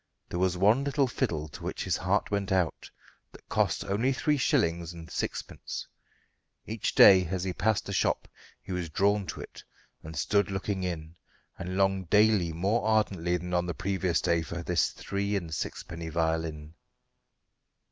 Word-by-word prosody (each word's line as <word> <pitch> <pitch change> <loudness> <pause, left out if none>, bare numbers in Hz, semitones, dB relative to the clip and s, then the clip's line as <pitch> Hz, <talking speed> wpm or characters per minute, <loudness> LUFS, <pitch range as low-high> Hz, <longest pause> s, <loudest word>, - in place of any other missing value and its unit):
There 90 - -3
was 90 -1 +1
one 105 +8 +4
little 140 0 +2
fiddle 80 - -2
to - - -11
which - - -3
his - - 0
heart - - 0
went 100 -1 -1
out, 90 -4 0 0.4
that - - -16
cost - - +1
only 110 +7 +1
three 150 +3 +1
shillings 85 - +1
and 85 -1 -10
sixpence. - - -4 0.8
Each 110 0 -3
day, 95 -2 +8
as 90 +1 -2
he 95 -1 -2
passed 110 +3 +1
the 100 - -4
shop, - - +1 0.4
he - - -8
was 90 -2 -2
drawn 100 +4 +1
to - - -5
it, - - -11 0.4
and 80 +1 -9
stood 100 0 +2
looking 95 0 -2
in, 85 -3 -4 0.4
and 95 +1 -4
longed 95 -2 +1
daily 105 -4 +4
more 95 +8 0
ardently 100 -6 +1
than 90 +1 -6
on 90 0 +1
the 85 - -3
previous 95 -3 0
day 85 -2 +2
for 85 +2 -5
this 85 0 +2
three 100 +1 -3
and 85 -5 -3
sixpenny 80 +3 -5
violin. 80 -2 -2
95 Hz, 165 wpm, -29 LUFS, 85-100 Hz, 0.8 s, day